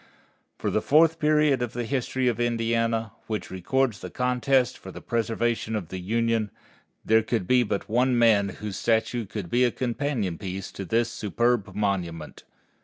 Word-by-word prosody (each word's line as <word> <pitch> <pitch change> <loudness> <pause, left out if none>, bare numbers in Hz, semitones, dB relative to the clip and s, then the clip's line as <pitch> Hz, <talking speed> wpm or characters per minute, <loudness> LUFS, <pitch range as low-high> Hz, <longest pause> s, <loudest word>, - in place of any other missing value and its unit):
For - - -2
the - - +1
fourth 160 +2 +4
period 150 -3 +3
of 120 -2 -2
the 120 - -3
history 130 +1 -1
of 120 -2 0
Indiana, 115 -1 0 0.2
which 110 -1 -4
records 110 +4 0
the - - -7
contest 125 0 +1
for - - -10
the - - -9
preservation 115 -1 -1
of 95 -7 -4
the 95 - -5
Union, 115 +2 0 0.6
there 110 0 +5
could 110 -3 -2
be 125 +5 +4
but 105 -4 -2
one 125 +3 +2
man 110 -4 +4
whose 100 0 -6
statue 115 0 0
should 100 -6 -5
be 125 +1 +3
a 125 - +4
companion 120 - -2
piece 95 -1 -5
to 95 - -6
this 115 +4 +1
superb 105 -2 0
monument. 90 -6 -3
115 Hz, 170 wpm, -26 LUFS, 105-125 Hz, 0.6 s, there